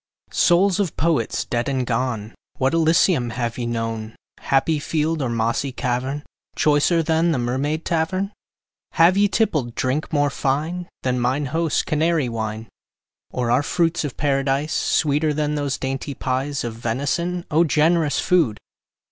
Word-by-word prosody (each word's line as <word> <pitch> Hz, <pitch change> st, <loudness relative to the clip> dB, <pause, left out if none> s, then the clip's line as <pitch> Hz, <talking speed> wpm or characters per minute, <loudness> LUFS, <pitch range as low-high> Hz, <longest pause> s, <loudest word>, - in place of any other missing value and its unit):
Souls 185 Hz, +2 st, +3 dB
of 190 Hz, -6 st, -1 dB
Poets 155 Hz, -8 st, 0 dB
dead 120 Hz, +2 st, -1 dB
and 130 Hz, -2 st, -1 dB
gone, 115 Hz, -3 st, -2 dB, 0.2 s
What 130 Hz, +3 st, +1 dB
Elysium 165 Hz, -5 st, +3 dB
have 120 Hz, -1 st, -2 dB
ye 120 Hz, -, -2 dB
known, 115 Hz, -1 st, -3 dB, 0.2 s
Happy 145 Hz, +3 st, +1 dB
field 155 Hz, +1 st, -1 dB
or 130 Hz, -, -1 dB
mossy 115 Hz, +4 st, 0 dB
cavern, 130 Hz, +3 st, -2 dB, 0.3 s
Choicer 155 Hz, +3 st, +3 dB
than 165 Hz, +1 st, +2 dB
the 155 Hz, -, +1 dB
Mermaid 135 Hz, +6 st, -1 dB
Tavern? 185 Hz, +4 st, -1 dB, 0.6 s
Have 170 Hz, +2 st, +5 dB
ye 205 Hz, +1 st, +4 dB
tippled 155 Hz, -, 0 dB
drink 135 Hz, +4 st, -1 dB
more 145 Hz, -2 st, +2 dB
fine 155 Hz, +7 st, -2 dB
Than 125 Hz, -1 st, 0 dB
mine 130 Hz, +4 st, 0 dB
host's 165 Hz, -2 st, +1 dB
Canary 155 Hz, -3 st, +1 dB
wine? 110 Hz, -1 st, -4 dB, 0.6 s
Or 120 Hz, -2 st, -1 dB
are 125 Hz, +3 st, +4 dB
fruits 165 Hz, +3 st, 0 dB
of 145 Hz, -4 st, -5 dB
Paradise 140 Hz, +1 st, 0 dB
Sweeter 150 Hz, 0 st, +1 dB
than 150 Hz, 0 st, 0 dB
those 145 Hz, -2 st, -1 dB
dainty 135 Hz, +1 st, -4 dB
pies 135 Hz, +3 st, -2 dB
Of 120 Hz, -2 st, -4 dB
venison? 140 Hz, +10 st, -2 dB
O 160 Hz, +3 st, +4 dB
generous 155 Hz, 0 st, +2 dB
food! 165 Hz, -, +2 dB
145 Hz, 150 wpm, -22 LUFS, 125-165 Hz, 0.6 s, Have